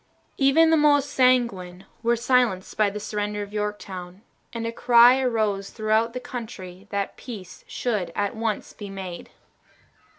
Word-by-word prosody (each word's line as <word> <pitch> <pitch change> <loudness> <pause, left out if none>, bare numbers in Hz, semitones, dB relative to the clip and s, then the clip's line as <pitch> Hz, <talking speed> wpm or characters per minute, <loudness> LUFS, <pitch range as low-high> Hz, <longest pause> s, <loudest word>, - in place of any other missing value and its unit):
Even 305 +4 +5
the 325 - +5
most 290 -1 +3
sanguine 195 -8 +1 0.2
were 235 0 +2
silenced 235 -5 +1
by 215 -1 +3
the 205 +1 -6
surrender 210 0 -3
of 205 0 -11
Yorktown, 200 -3 -5 0.3
and 230 -1 -5
a 230 - -2
cry 240 +2 +6
arose 215 -6 0
throughout 220 +1 0
the 250 - -4
country 200 -7 -8
that 200 -1 -3
peace 205 -8 -10
should 210 -8 -2
at 205 +1 -1
once 220 -2 -3
be 205 -2 -9
made. 190 -3 -7
215 Hz, 145 wpm, -24 LUFS, 195-245 Hz, 0.3 s, cry